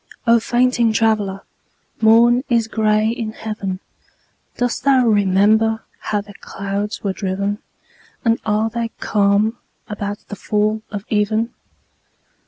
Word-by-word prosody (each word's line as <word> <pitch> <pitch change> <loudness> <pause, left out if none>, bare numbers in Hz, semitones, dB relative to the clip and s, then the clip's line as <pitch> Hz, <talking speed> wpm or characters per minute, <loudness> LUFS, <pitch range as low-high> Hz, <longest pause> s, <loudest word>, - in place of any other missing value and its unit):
O 235 0 +5
fainting 240 0 +2
traveller, 210 -3 +1 0.6
morn 235 +3 +5
is 230 -2 +2
gray 215 -1 +2
in 225 -2 -3
heaven. 200 -4 -4 0.8
Dost 245 -1 -1
thou 265 -3 +4
remember 215 +2 +3 0.2
how 210 -1 -2
the 205 0 -13
clouds 200 +1 -4
were 195 -2 -1
driven? 200 +1 -2 0.7
And 230 0 +3
are 215 +1 0
they 235 0 -2
calm 210 +2 +1 0.3
about 205 0 -5
the - - -6
fall 215 +1 0
of 205 -1 -6
even? 220 +2 0
215 Hz, 120 wpm, -19 LUFS, 205-230 Hz, 0.8 s, O